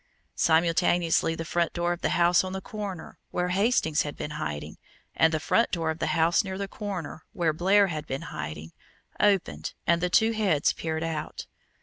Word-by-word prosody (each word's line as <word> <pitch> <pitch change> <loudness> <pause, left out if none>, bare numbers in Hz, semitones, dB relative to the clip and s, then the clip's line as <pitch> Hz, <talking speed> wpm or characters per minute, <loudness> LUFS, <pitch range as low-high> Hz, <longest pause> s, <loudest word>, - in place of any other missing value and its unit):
Simultaneously 165 0 +2
the 165 - -5
front 170 0 0
door 175 0 0
of 175 - -8
the - - +1
house 175 +1 +4
on 185 0 -5
the 190 - -3
corner, 200 -4 -7
where 180 0 -1
Hastings 190 -5 +2
had 145 - -5
been 150 - -5
hiding, 75 - -5 0.4
and 160 - +4
the 160 - 0
front 230 +8 +2
door 165 -3 -1
of 160 - -7
the - - -1
house 165 +4 +3
near 190 -1 -5
the 200 0 -3
corner, 190 -7 -6
where 165 -3 +1
Blair 195 +5 +4
had 155 -5 -4
been 135 +4 -4
hiding, 80 +1 -6 0.5
opened 185 - +1
and 170 +2 +2
two 220 +4 +4
heads 200 -10 +2
peered 160 0 -3
out. 160 -2 -4
170 Hz, 185 wpm, -27 LUFS, 160-190 Hz, 0.5 s, house